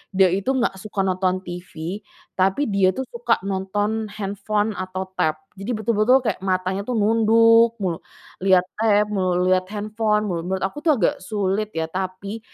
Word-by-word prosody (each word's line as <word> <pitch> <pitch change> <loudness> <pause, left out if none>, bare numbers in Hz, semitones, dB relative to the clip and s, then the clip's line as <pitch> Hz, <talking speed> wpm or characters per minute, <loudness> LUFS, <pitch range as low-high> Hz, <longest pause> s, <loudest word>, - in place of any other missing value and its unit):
dia 190 -1 +5
itu 195 +7 -1
nggak 220 -7 0
suka 200 -1 -3
nonton 185 0 0
TV 175 +1 -6 0.3
tapi 190 +7 +1
dia 195 -1 +4
itu 265 - -2
suka 235 0 +1
nonton 205 +3 -1
handphone 205 +1 -2
atau 185 0 -4 0.2
tab, 155 -1 +2 0.2
jadi 210 +5 -4
betul-betul 220 +3 +3
kayak 225 - -1
matanya 185 0 -1
tuh 250 - -1
nunduk 230 +2 +5
mulu, 175 -3 -1 0.4
lihat 185 -1 +4 0.2
tab 210 -1 +3
melulu, 185 -2 +1
lihat 185 0 +2
handphone 215 +1 -1
melulu, 170 -1 -2
menurut 190 0 -2
aku 195 +10 -3
tuh 310 -1 +3
agak 205 -9 +1
sulit 205 +1 -1
ya 160 0 -2
tapi, 190 +3 -4
195 Hz, 165 wpm, -22 LUFS, 185-215 Hz, 0.4 s, dia